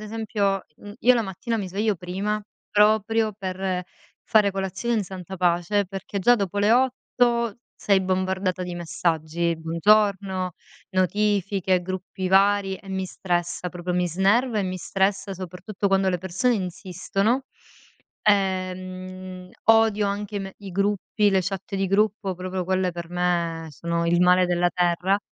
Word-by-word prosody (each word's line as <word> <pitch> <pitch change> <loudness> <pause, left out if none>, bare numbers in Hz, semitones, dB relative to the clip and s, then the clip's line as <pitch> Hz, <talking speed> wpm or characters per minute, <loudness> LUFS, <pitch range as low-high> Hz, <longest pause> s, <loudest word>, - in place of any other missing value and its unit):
esempio, 210 -3 -1
mhmm, 205 0 -11
io 250 +2 +6
la 235 - +1
mattina 220 +4 -3
mi 195 -4 -3
sveglio 205 +2 0
prima, 195 +4 -2 0.3
proprio 215 +1 +3
per 185 -2 -3 0.4
fare 210 -2 +4
colazione 195 +4 -2
in 205 - 0
santa 190 0 -8
pace, 180 +3 +1
perché 195 +1 -5
già 240 +6 +5
dopo 200 -1 -2
le 205 +2 +4
8 240 -2 +1 0.2
sei 195 -2 +2
bombardata 185 0 -1
di 180 -1 -5
messaggi: 170 0 -1
buongiorno, 190 +2 +2 0.4
notifiche, 190 -1 +1
gruppi 185 0 -4
vari. 195 0 +3
E 195 - -16
mi 190 0 -2
stressa 175 -1 -2
proprio, 180 0 -4
mi 180 0 +1
snerva 210 +7 +2
e - - 0
mi 185 0 -3
stressa, 195 +1 -1
soprattutto 185 +3 -4
quando 195 0 +3
le 180 -1 0
persone 190 +7 0
insistono. 195 +5 -1 0.8
Ehm, 185 -2 -1
odio 225 -2 +4
anche 205 +1 -3
i - - 0
me 195 0 -7
i 200 -2 -9
gruppi, 205 +2 +1
le 190 -1 +3
chat 195 +1 -4
di 195 - 0
gruppo, 200 -1 +1
proprio 185 0 -4
quelle, 185 0 0
per 170 0 -7
me, 170 -2 -1
sono 170 +2 -2
il 175 +1 +3
male 180 0 +5
della 175 0 +2
terra. 180 +2 +2
190 Hz, 145 wpm, -24 LUFS, 180-205 Hz, 0.8 s, io